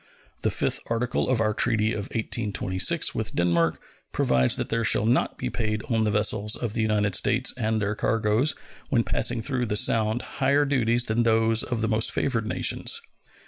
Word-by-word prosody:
The -, -, +1 dB
fifth -, -, 0 dB
article 120 Hz, +2 st, -1 dB
of 130 Hz, -3 st, +1 dB
our 110 Hz, -1 st, +1 dB
treaty 110 Hz, -1 st, +1 dB
of 100 Hz, -, -4 dB
1826 105 Hz, -5 st, 0 dB
with -, -, -4 dB
Denmark 85 Hz, -2 st, +1 dB, 0.3 s
provides 65 Hz, -1 st, +2 dB
that -, -, -3 dB
there 115 Hz, 0 st, -1 dB
shall 110 Hz, -, +3 dB
not 120 Hz, +4 st, +1 dB
be -, -, -4 dB
paid 105 Hz, -2 st, -2 dB
on 110 Hz, -1 st, +1 dB
the -, -, +1 dB
vessels 105 Hz, 0 st, 0 dB
of 115 Hz, -4 st, -4 dB
the 115 Hz, -, -1 dB
United 105 Hz, -2 st, 0 dB
States 120 Hz, +6 st, +1 dB
and 110 Hz, -3 st, -1 dB
their 105 Hz, 0 st, -1 dB
cargoes 110 Hz, +6 st, 0 dB, 0.3 s
when 120 Hz, -6 st, +2 dB
passing 115 Hz, 0 st, 0 dB
through 125 Hz, -2 st, -2 dB
the 105 Hz, -, -1 dB
Sound 110 Hz, +2 st, +1 dB, 0.2 s
higher 140 Hz, +2 st, +3 dB
duties 120 Hz, -3 st, +1 dB
than 110 Hz, +2 st, 0 dB
those 115 Hz, 0 st, +3 dB
of 120 Hz, -2 st, -2 dB
the 110 Hz, -, 0 dB
most 110 Hz, 0 st, +2 dB
favored 115 Hz, -5 st, -1 dB
nations. -, -, +1 dB
110 Hz, 185 wpm, -25 LUFS, 105-120 Hz, 0.3 s, shall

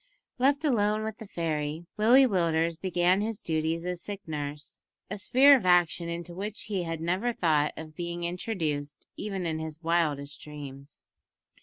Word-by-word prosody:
Left 280 Hz, +4 st, +3 dB
alone 215 Hz, -5 st, +2 dB
with 220 Hz, -1 st, -5 dB
the 220 Hz, -, -9 dB
fairy, 160 Hz, -2 st, -2 dB
Willie 240 Hz, +6 st, +6 dB
Willders 170 Hz, -6 st, +1 dB
began 180 Hz, +1 st, +2 dB
his 220 Hz, 0 st, -3 dB
duties 160 Hz, +1 st, -1 dB
as 180 Hz, -1 st, -3 dB
sick 205 Hz, -3 st, -7 dB
nurse, 150 Hz, -1 st, -5 dB, 0.3 s
a 200 Hz, -, -3 dB
sphere 270 Hz, +7 st, +7 dB
of 250 Hz, -, 0 dB
action 175 Hz, -1 st, +3 dB
into 170 Hz, +1 st, -5 dB
which 205 Hz, +4 st, -5 dB
he 205 Hz, -3 st, -2 dB
had 165 Hz, -2 st, -4 dB
never 185 Hz, +9 st, 0 dB
thought 155 Hz, -7 st, +2 dB
of 155 Hz, -1 st, -9 dB
being 170 Hz, 0 st, -4 dB
introduced, 160 Hz, -5 st, -3 dB
even 195 Hz, -3 st, -4 dB
in 160 Hz, -1 st, -1 dB
his 160 Hz, -1 st, -6 dB
wildest 150 Hz, -4 st, 0 dB
dreams. 140 Hz, -1 st, -10 dB
170 Hz, 160 wpm, -28 LUFS, 160-205 Hz, 0.3 s, sphere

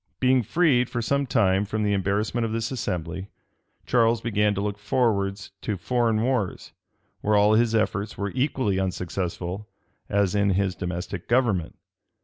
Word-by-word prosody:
Being 130 Hz, 0 st, +4 dB
freed 125 Hz, -, +2 dB
for 120 Hz, -, -3 dB
some 140 Hz, +4 st, 0 dB
time 100 Hz, -7 st, +3 dB
from 105 Hz, +1 st, -2 dB
the 105 Hz, -1 st, +1 dB
embarrassment 100 Hz, +4 st, 0 dB
of 115 Hz, -, -1 dB
this 115 Hz, +1 st, -2 dB
assembly, 95 Hz, -5 st, -4 dB, 0.6 s
Charles 115 Hz, -1 st, +3 dB
began 105 Hz, -2 st, +1 dB
to 100 Hz, -, -2 dB
look 105 Hz, 0 st, -4 dB
towards 105 Hz, -4 st, 0 dB, 0.3 s
foreign 115 Hz, +2 st, +1 dB
wars, 120 Hz, -7 st, -1 dB, 0.5 s
where 105 Hz, +1 st, +1 dB
all 105 Hz, +1 st, +5 dB
his 115 Hz, 0 st, +3 dB
efforts 105 Hz, -1 st, -1 dB
were 100 Hz, -1 st, -2 dB
equally 130 Hz, -7 st, 0 dB
unsuccessful 90 Hz, +1 st, -3 dB, 0.4 s
as 100 Hz, -1 st, +2 dB
in 100 Hz, -2 st, +2 dB
his 100 Hz, -2 st, +1 dB
domestic 90 Hz, -1 st, -5 dB
government. 115 Hz, -9 st, +1 dB
105 Hz, 145 wpm, -25 LUFS, 100-120 Hz, 0.6 s, all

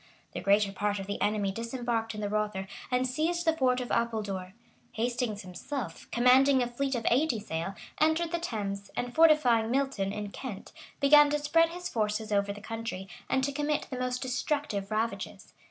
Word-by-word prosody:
The -, -, -5 dB
greater 200 Hz, 0 st, +3 dB
part 205 Hz, +1 st, -1 dB
of 195 Hz, -, -5 dB
the 200 Hz, +1 st, -4 dB
enemy 205 Hz, -2 st, +1 dB
disembarked 230 Hz, 0 st, -2 dB
in 210 Hz, -, -5 dB
the 205 Hz, -, -1 dB
Rother 210 Hz, -2 st, -1 dB, 0.2 s
and 250 Hz, 0 st, +1 dB
seized 330 Hz, +7 st, -1 dB
the 325 Hz, -1 st, +3 dB
fort 255 Hz, -4 st, +2 dB
of 250 Hz, -, -5 dB
Apuldore. 205 Hz, -5 st, -1 dB, 0.4 s
Hastings 230 Hz, -2 st, -2 dB
himself, 245 Hz, +10 st, -6 dB
commanding 260 Hz, +2 st, +5 dB
a -, -, -1 dB
fleet 265 Hz, +2 st, -2 dB
of 230 Hz, -2 st, -3 dB
eighty 255 Hz, -1 st, +2 dB
sail, 190 Hz, -1 st, -4 dB, 0.2 s
entered 315 Hz, +2 st, +2 dB
the 340 Hz, -, 0 dB
Thames, 200 Hz, -, -4 dB
and 245 Hz, 0 st, -2 dB
fortifying 300 Hz, -9 st, +5 dB
Milton, 255 Hz, -7 st, 0 dB
in 210 Hz, 0 st, -5 dB
Kent, 220 Hz, -6 st, -7 dB, 0.3 s
began 295 Hz, +1 st, +7 dB
to 295 Hz, -, +1 dB
spread 330 Hz, +3 st, +3 dB
his 355 Hz, +1 st, -5 dB
forces 215 Hz, -4 st, -1 dB
over 200 Hz, 0 st, +2 dB
the 205 Hz, +1 st, -8 dB
country, 225 Hz, -4 st, -5 dB, 0.2 s
and 265 Hz, -, +2 dB
to 280 Hz, -, +1 dB
commit 295 Hz, +1 st, 0 dB
the 255 Hz, -, -4 dB
most 250 Hz, 0 st, -2 dB
destructive 255 Hz, -5 st, -2 dB
ravages. 220 Hz, +2 st, -3 dB
235 Hz, 180 wpm, -29 LUFS, 210-275 Hz, 0.4 s, began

